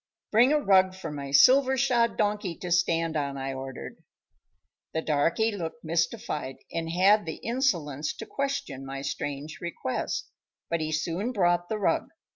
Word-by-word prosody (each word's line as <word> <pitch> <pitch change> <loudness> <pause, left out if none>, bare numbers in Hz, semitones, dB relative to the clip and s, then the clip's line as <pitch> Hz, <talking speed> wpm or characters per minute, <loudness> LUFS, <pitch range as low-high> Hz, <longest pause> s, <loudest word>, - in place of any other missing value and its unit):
"Bring 240 +5 +5
a 300 - +4
rug 190 -6 +4
for 190 -4 -6
my 140 -2 -6
silver 260 - +6
shod 240 -3 +2
donkey 205 -4 0
to 180 - -6
stand 165 -2 +2
on," 140 -2 -2
I 135 0 -3
ordered. 130 0 -7 1.0
The 160 - 0
darkey 165 +9 +2
looked 160 -4 -6
mystified, 165 - -2 0.2
and 165 0 -2
had 190 +3 +4
the 160 - -3
insolence 170 - -1
to - - -7
question 275 - -3
my 135 0 -6
strange 145 +1 -4
request, 170 -6 -3 0.4
but 170 -1 +1
he 155 0 -2
soon 170 +8 -1
brought 175 -5 +1
the 220 - -1
rug. 205 - +1
170 Hz, 155 wpm, -27 LUFS, 150-210 Hz, 1.0 s, silver